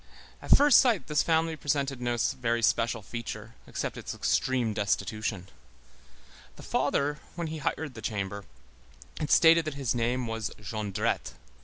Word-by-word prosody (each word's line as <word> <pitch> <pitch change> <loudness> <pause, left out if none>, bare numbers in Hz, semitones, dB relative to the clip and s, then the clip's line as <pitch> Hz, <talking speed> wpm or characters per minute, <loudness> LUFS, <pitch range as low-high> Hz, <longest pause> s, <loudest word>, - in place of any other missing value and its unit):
At - - +6
first 290 -3 +7
sight, 235 -8 +3
this 150 -1 +2
family 160 0 +1
presented 140 -3 -1
no 120 -1 -1
very 115 -1 0
special 115 0 +1
feature 115 0 -7
except - - -4
its - - -6
extreme 125 -4 +1
destitution; 105 -1 -2 1.1
the - - -12
father, 145 +1 0 0.2
when 170 -1 -3
he 160 0 -5
hired 150 0 -2
the 115 - -9
chamber, 100 -2 -4 0.7
had 150 - -2
stated 165 0 +6
that 155 -2 -4
his 135 -4 -1
name 120 +1 0
was 115 -1 -3
Jondrette. 105 -1 -2
120 Hz, 145 wpm, -28 LUFS, 110-150 Hz, 1.1 s, first